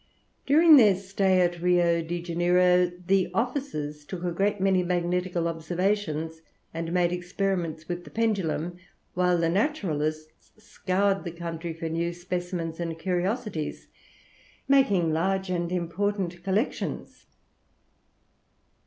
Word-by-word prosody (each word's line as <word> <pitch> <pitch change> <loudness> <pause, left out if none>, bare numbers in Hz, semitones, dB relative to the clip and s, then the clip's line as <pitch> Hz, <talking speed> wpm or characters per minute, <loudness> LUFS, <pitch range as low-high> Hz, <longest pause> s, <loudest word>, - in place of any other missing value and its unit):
During 310 +2 +7
their 210 -6 +6
stay 190 0 +1
at 175 -1 0
Rio 175 -1 +3
de 170 +1 -4
Janeiro 180 +1 +3
the 190 -1 +2
officers 210 - -2
took 175 +3 -7
a 175 - -1
great 200 +4 0
many 190 -1 +3
magnetical 180 0 -1
observations 165 -1 -2 0.3
and 165 0 -4
made 175 -1 +2
experiments 175 -3 -2
with 175 0 -4
the - - -12
pendulum, 180 -6 -1 0.3
whilst 180 -1 +2
the 165 - +2
naturalists 155 - -2
scoured 195 -1 -1
the 175 - -4
country 170 0 -5
for 165 0 -4
new 170 +1 -1
specimens 175 -2 -4
and 165 -1 -3
curiosities, 185 0 -2 0.8
making 200 - +3
large 190 +3 0
and 175 -1 -1
important 180 0 -2
collections. 200 +7 -2
180 Hz, 120 wpm, -26 LUFS, 170-195 Hz, 0.8 s, During